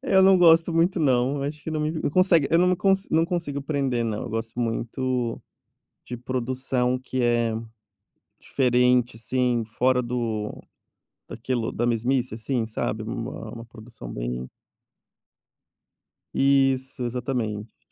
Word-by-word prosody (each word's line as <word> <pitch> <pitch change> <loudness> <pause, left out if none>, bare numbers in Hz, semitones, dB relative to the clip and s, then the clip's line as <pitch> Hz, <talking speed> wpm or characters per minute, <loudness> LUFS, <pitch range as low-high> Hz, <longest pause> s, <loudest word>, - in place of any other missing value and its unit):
Eu 190 - +7
não 190 -1 +6
gosto 165 -1 +5
muito 170 +2 +2
não, 135 0 +2
acho 150 +1 -5
que 160 - -4
não 155 - -2
me 155 +1 0
não 160 -2 -2
consegue 170 -3 +4
eu 165 - +5
não 180 - +4
me 185 - +3 0.4
não 165 +1 +3
consigo 165 -6 -3
prender 135 -5 -1
não, 110 -1 -3
eu 120 - -6
gosto 115 +2 -4
muito 120 +1 -2 0.7
de 125 - -5
produção 125 0 -1
que 130 0 -3
é 120 -1 +2 0.9
diferente, 125 -2 +2
assim, 120 0 0
fora 125 +2 +1
do 115 -3 -2 0.8
daquilo 120 0 -2
da 120 - -1
mesmice, 120 +1 0
assim, 115 0 -2
sabe, 110 - -3
uma - - -6
uma 115 0 -9
produção 115 - -11
bem 60 +1 -4 1.9
Isso, 135 -2 +2
exatamente 120 -4 -3
125 Hz, 135 wpm, -25 LUFS, 115-140 Hz, 1.9 s, Eu